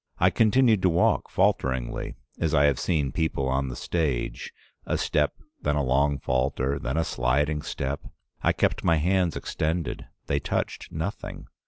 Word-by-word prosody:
I -, -, +4 dB
continued 115 Hz, -2 st, +4 dB
to 95 Hz, -, +4 dB
walk 85 Hz, +1 st, +2 dB
falteringly, 65 Hz, -2 st, 0 dB, 0.2 s
as 80 Hz, -2 st, +1 dB
I 70 Hz, -, +5 dB
have 70 Hz, -3 st, +2 dB
seen 75 Hz, -6 st, 0 dB
people 75 Hz, -3 st, -1 dB
on 65 Hz, +1 st, 0 dB
the 65 Hz, -, -5 dB
stage: 75 Hz, -4 st, -2 dB, 0.4 s
a -, -, +1 dB
step, -, -, +1 dB, 0.3 s
then 75 Hz, 0 st, +1 dB
a 75 Hz, -, +1 dB
long 70 Hz, +2 st, +2 dB
falter, 65 Hz, +1 st, 0 dB
then 65 Hz, +5 st, -2 dB
a 80 Hz, -, +3 dB
sliding 75 Hz, +3 st, 0 dB
step. 70 Hz, -3 st, -3 dB, 0.4 s
I -, -, +3 dB
kept -, -, 0 dB
my 85 Hz, -, +4 dB
hands 90 Hz, +2 st, +1 dB
extended; 80 Hz, +2 st, -2 dB, 0.2 s
they 70 Hz, -, 0 dB
touched -, -, -3 dB
nothing. 80 Hz, +5 st, -5 dB
75 Hz, 160 wpm, -26 LUFS, 65-80 Hz, 0.4 s, I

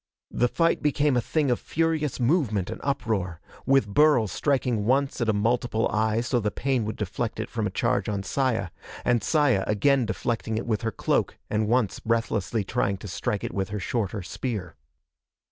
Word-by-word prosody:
The 125 Hz, -, +2 dB
fight 165 Hz, +6 st, +1 dB
became 150 Hz, -1 st, +2 dB
a 120 Hz, -, +3 dB
thing 145 Hz, +1 st, 0 dB
of 120 Hz, -, +1 dB
furious 160 Hz, -3 st, -1 dB
movement 120 Hz, -, +1 dB
and -, -, -7 dB
uproar, 110 Hz, -11 st, -1 dB, 0.3 s
with 135 Hz, -4 st, +4 dB
Burl 145 Hz, +2 st, +4 dB
striking 125 Hz, -2 st, 0 dB
once 135 Hz, +4 st, +1 dB
at 115 Hz, -, +1 dB
a -, -, +6 dB
multiple 115 Hz, +2 st, +1 dB
eye 110 Hz, +1 st, +1 dB
so 120 Hz, +1 st, 0 dB
the 105 Hz, -2 st, 0 dB
pain 130 Hz, +1 st, -1 dB
would 110 Hz, -, -3 dB
deflect -, -, -3 dB
it -, -, -4 dB
from -, -, -1 dB
a -, -, -2 dB
charge -, -, 0 dB
on 100 Hz, -2 st, -2 dB
Saya, 115 Hz, -5 st, 0 dB, 0.4 s
and 120 Hz, -2 st, +3 dB
Saya 145 Hz, -11 st, +3 dB
again 125 Hz, +4 st, +2 dB
deflecting 110 Hz, 0 st, -2 dB
it 115 Hz, -, -3 dB
with 110 Hz, -3 st, -1 dB
her 115 Hz, -, -1 dB
cloak -, -, 0 dB
and 105 Hz, 0 st, +1 dB
once 120 Hz, -2 st, +1 dB
breathlessly 115 Hz, -2 st, 0 dB
trying 100 Hz, -2 st, 0 dB
to 100 Hz, -, -9 dB
strike 100 Hz, +2 st, -2 dB
it -, -, -4 dB
with 95 Hz, 0 st, -2 dB
her 105 Hz, +1 st, -3 dB
shorter 100 Hz, -1 st, -2 dB
spear. 95 Hz, 0 st, -4 dB
115 Hz, 185 wpm, -26 LUFS, 105-135 Hz, 0.4 s, a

